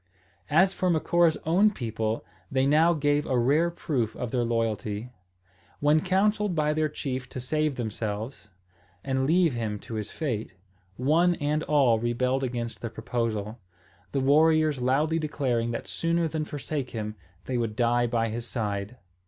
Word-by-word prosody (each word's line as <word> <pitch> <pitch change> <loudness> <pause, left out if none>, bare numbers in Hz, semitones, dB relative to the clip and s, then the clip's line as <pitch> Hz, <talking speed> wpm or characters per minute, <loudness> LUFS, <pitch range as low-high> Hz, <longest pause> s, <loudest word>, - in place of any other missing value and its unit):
As 190 +5 +4
for 185 - 0
Macora's 170 0 +3
own 185 +7 +4
people, 115 - -3 0.3
they 130 0 +2
now 155 +4 +5
gave 145 0 +1
a 130 - +1
rare 145 +8 +3
proof 130 -9 -2
of 120 -2 -4
their 125 -2 +1
loyalty. 115 -1 -2 0.7
When 150 +2 +4
counselled 200 +1 +1
by 150 -1 +2
their 155 0 +1
chief 130 -3 -4
to - - -6
save 150 +3 0
themselves, 110 -1 -4 0.5
and 130 0 0
leave 170 -1 +3
him 110 -3 -2
to - - -9
his 110 -1 -4
fate, 115 - -4 0.4
one 165 +7 +3
and 150 0 0
all 135 -7 +4
rebelled 125 +3 0
against 120 -2 -4
the 115 - -3
proposal; 110 -1 -3 0.5
the 140 - 0
warriors 155 0 +4
loudly 150 +6 +2
declaring 130 -7 -1
that 120 - -4
sooner 165 0 0
than 155 -1 -3
forsake 145 -2 -4
him 105 -2 -4 0.3
they 125 -2 -1
would 115 -2 -2
die 120 0 +2
by 115 -1 0
his 115 +2 -4
side. 105 0 -3
130 Hz, 155 wpm, -27 LUFS, 115-155 Hz, 0.7 s, now